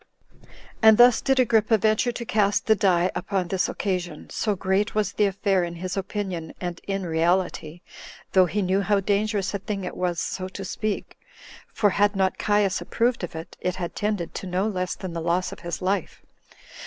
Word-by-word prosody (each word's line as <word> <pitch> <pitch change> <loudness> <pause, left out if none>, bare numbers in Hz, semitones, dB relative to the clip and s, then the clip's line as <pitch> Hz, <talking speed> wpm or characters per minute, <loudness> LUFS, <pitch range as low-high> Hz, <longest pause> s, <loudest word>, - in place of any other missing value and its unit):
8. - - -23 0.3
And 220 -1 +7
thus 240 -1 +6
did 270 -1 +2
Agrippa 225 -2 +4
venture 215 +4 +2
to 235 0 -6
cast 205 -2 +1
the 220 - +5
die 185 -2 +2
upon 190 -3 -2
this 190 0 0
occasion, 180 -5 -3
so 210 -2 0
great 190 +3 0
was 210 -2 0
the 210 - +3
affair 195 -1 +1
in 170 0 -4
his 180 +2 -4
opinion, 190 -4 -4
and 175 -2 -5
in 195 -1 -2
reality, 170 0 0 0.5
though 185 -1 +5
he 205 +3 -1
knew 190 +2 +1
how 200 +1 +2
dangerous 205 0 0
a 200 - -2
thing 200 -1 -4
it 180 - -5
was 175 -2 -1
so 185 +3 -3
to 190 +1 -7
speak; 210 +2 -4 0.5
for 205 -2 +2
had 205 +2 +2
not 190 -1 0
Caius 205 -2 +1
approved 235 -2 0
of 170 - -5
it, 165 +2 -8
it 180 0 -1
had 175 -2 -5
tended 205 -5 -2
to 190 - -6
no 185 +3 0
less 185 -4 -2
than 185 -3 -7
the 165 - -3
loss 175 +2 0
of - - -9
his 170 0 -5
life. 190 -1 -2
195 Hz, 195 wpm, -25 LUFS, 180-210 Hz, 0.5 s, And